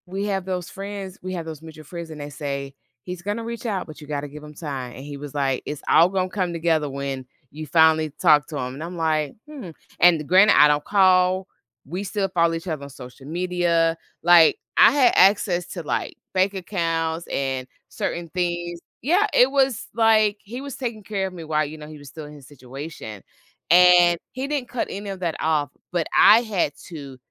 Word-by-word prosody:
We 195 Hz, +3 st, -3 dB
have 195 Hz, -3 st, -2 dB
those 180 Hz, -2 st, -4 dB
friends, 195 Hz, -1 st, -7 dB
We 185 Hz, 0 st, -5 dB
have 170 Hz, -3 st, -4 dB
those 160 Hz, -2 st, -8 dB
mutual 160 Hz, -1 st, -12 dB
friends, 170 Hz, +2 st, -8 dB
and 155 Hz, -1 st, -9 dB
they 145 Hz, -, -6 dB
say, 140 Hz, -2 st, -5 dB, 0.3 s
he's 180 Hz, -1 st, -7 dB
gonna 205 Hz, +5 st, -3 dB
reach 235 Hz, +1 st, -6 dB
out, 200 Hz, -5 st, -2 dB
but 155 Hz, -, -11 dB
you 150 Hz, -, -11 dB
gotta 145 Hz, -1 st, -3 dB
give 150 Hz, +1 st, -11 dB
him 150 Hz, 0 st, -11 dB
time. 135 Hz, -6 st, -6 dB
And 135 Hz, -, -10 dB
he 145 Hz, 0 st, -8 dB
was 145 Hz, -1 st, -9 dB
like, 135 Hz, -3 st, -1 dB
it's 150 Hz, -1 st, -6 dB
all 170 Hz, +2 st, +6 dB
gonna 185 Hz, -1 st, -1 dB
come 185 Hz, -3 st, -2 dB
together 160 Hz, -3 st, 0 dB
when 135 Hz, -1 st, -5 dB, 0.3 s
you 155 Hz, +1 st, -7 dB
finally 160 Hz, 0 st, +4 dB
talk 150 Hz, -1 st, +4 dB
to 155 Hz, -, -6 dB
him. 125 Hz, -1 st, -4 dB
And 145 Hz, +4 st, -7 dB
I'm 175 Hz, +1 st, -7 dB
like, 155 Hz, -3 st, 0 dB
hmm 275 Hz, -, -9 dB, 0.3 s
And 165 Hz, -4 st, +4 dB
granted, 190 Hz, +3 st, +6 dB
I 150 Hz, -, +8 dB
don't 150 Hz, 0 st, +1 dB
call. 185 Hz, -1 st, +3 dB, 0.4 s
We 180 Hz, +8 st, -5 dB
still 200 Hz, 0 st, -2 dB
follow 170 Hz, -2 st, +2 dB
each 165 Hz, +2 st, -5 dB
other 155 Hz, -4 st, -4 dB
on 140 Hz, -, -8 dB
social 130 Hz, 0 st, -12 dB
media. 170 Hz, -1 st, 0 dB, 0.3 s
Like, 170 Hz, -2 st, +6 dB, 0.2 s
I -, -, +8 dB
had 260 Hz, -3 st, +4 dB
access 185 Hz, -2 st, +4 dB
to, 175 Hz, -, -6 dB
like, -, -, -3 dB, 0.2 s
bank 190 Hz, +1 st, +2 dB
accounts 165 Hz, -3 st, -2 dB
and 135 Hz, -2 st, -2 dB, 0.2 s
certain 170 Hz, -1 st, -4 dB
things. 175 Hz, -1 st, -3 dB, 0.2 s
Yeah, 355 Hz, -, +3 dB
It 250 Hz, -, +5 dB
was 270 Hz, -4 st, +1 dB
like, 215 Hz, -2 st, +4 dB
he 240 Hz, +6 st, -7 dB
was 280 Hz, -1 st, -7 dB
taking 230 Hz, -5 st, -5 dB
care 195 Hz, -2 st, -2 dB
of 190 Hz, -, -9 dB
me 170 Hz, -2 st, -8 dB
while, 155 Hz, -1 st, 0 dB
you 150 Hz, +2 st, -8 dB
know, 150 Hz, -1 st, -10 dB
he 155 Hz, 0 st, -10 dB
was 145 Hz, -1 st, -13 dB
still 155 Hz, +2 st, -9 dB
in 150 Hz, -, -11 dB
his 140 Hz, -3 st, -14 dB
situation. 130 Hz, -, -9 dB, 0.5 s
And 175 Hz, -1 st, +6 dB
he 260 Hz, +2 st, -4 dB
didn't 285 Hz, -4 st, -3 dB
cut 250 Hz, -, -2 dB
any 200 Hz, +1 st, -6 dB
of 190 Hz, -1 st, -7 dB
that 170 Hz, -3 st, -1 dB
off, 150 Hz, -2 st, 0 dB, 0.2 s
but 175 Hz, -3 st, 0 dB
I 225 Hz, +2 st, +8 dB
had 200 Hz, -10 st, -1 dB, 0.2 s
to 140 Hz, -6 st, -9 dB
170 Hz, 210 wpm, -23 LUFS, 150-190 Hz, 0.5 s, I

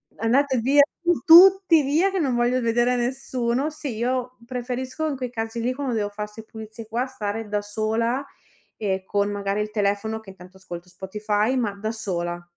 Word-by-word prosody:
andate 260 Hz, +4 st, +2 dB
via 275 Hz, +5 st, +5 dB, 0.2 s
tu 350 Hz, 0 st, +2 dB
tutti 360 Hz, -2 st, +8 dB
via 315 Hz, +8 st, +2 dB
che 385 Hz, -, -3 dB
non 275 Hz, -7 st, +1 dB
voglio 240 Hz, +1 st, +2 dB
vedere 240 Hz, +2 st, +2 dB
nessuno." 250 Hz, +2 st, -1 dB
Sì, 290 Hz, -6 st, -6 dB
io 250 Hz, +1 st, -2 dB
preferisco 255 Hz, +4 st, -4 dB
in 290 Hz, -, -2 dB
quei 255 Hz, -2 st, -4 dB
casi 225 Hz, 0 st, -4 dB
lì 245 Hz, +2 st, 0 dB
quando 265 Hz, -2 st, -3 dB
devo 205 Hz, -2 st, -1 dB
fa 210 Hz, +1 st, -5 dB
'ste 215 Hz, +1 st, -12 dB
pulizie 220 Hz, 0 st, -10 dB
qua, 240 Hz, +3 st, -1 dB
stare 225 Hz, -4 st, -4 dB
da 205 Hz, 0 st, -1 dB
sola 220 Hz, +5 st, -1 dB, 0.5 s
e 190 Hz, -3 st, -2 dB
con 205 Hz, +1 st, 0 dB
magari 200 Hz, 0 st, -2 dB
il 210 Hz, -, -3 dB
telefono 210 Hz, +1 st, -1 dB
che 200 Hz, -3 st, -12 dB
intanto 185 Hz, 0 st, -15 dB
ascolto 175 Hz, -1 st, -9 dB
Spotify, 210 Hz, +5 st, -1 dB
ma 220 Hz, -5 st, 0 dB
da 215 Hz, +2 st, -3 dB
sola. 175 Hz, -5 st, -4 dB
230 Hz, 180 wpm, -24 LUFS, 205-260 Hz, 0.5 s, tutti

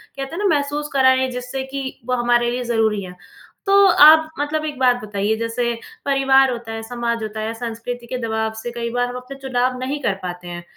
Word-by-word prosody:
कहते 275 Hz, +4 st, -5 dB
हैं -, -, -6 dB
ना, 335 Hz, -6 st, +3 dB
महसूस 290 Hz, +1 st, -2 dB
कराएँ, 260 Hz, -1 st, +4 dB
जिससे 250 Hz, +2 st, -4 dB
कि 270 Hz, -1 st, -5 dB
वो 250 Hz, 0 st, 0 dB
हमारे 240 Hz, 0 st, +3 dB
लिए 250 Hz, 0 st, -2 dB
ज़रूरी 220 Hz, -3 st, +1 dB
हैं। 180 Hz, 0 st, -9 dB, 0.5 s
तो 395 Hz, -, +2 dB
आप 320 Hz, -3 st, +7 dB
मतलब 305 Hz, +1 st, -1 dB
एक 295 Hz, -3 st, -4 dB
बात 250 Hz, -1 st, +4 dB
बताइए, 205 Hz, +1 st, -1 dB
जैसे 230 Hz, +1 st, -2 dB, 0.4 s
परिवार 270 Hz, -1 st, +4 dB
होता 235 Hz, -2 st, -6 dB
है, 225 Hz, 0 st, -5 dB
समाज 235 Hz, -1 st, -3 dB
होता 215 Hz, 0 st, -5 dB
है, 220 Hz, +1 st, -3 dB
संस्कृति 235 Hz, +1 st, -6 dB
के 255 Hz, -, -3 dB
दबाव 220 Hz, 0 st, -1 dB
से 240 Hz, +2 st, -6 dB
कई 235 Hz, 0 st, -4 dB
बार 245 Hz, 0 st, +1 dB
हम 245 Hz, -, -7 dB
अपने 260 Hz, +2 st, -9 dB
चुनाव 255 Hz, -1 st, -1 dB
नहीं 275 Hz, +3 st, -3 dB
कर 200 Hz, -, +1 dB
पाते 180 Hz, 0 st, -6 dB
हैं, 175 Hz, 0 st, -7 dB
245 Hz, 210 wpm, -20 LUFS, 225-270 Hz, 0.5 s, आप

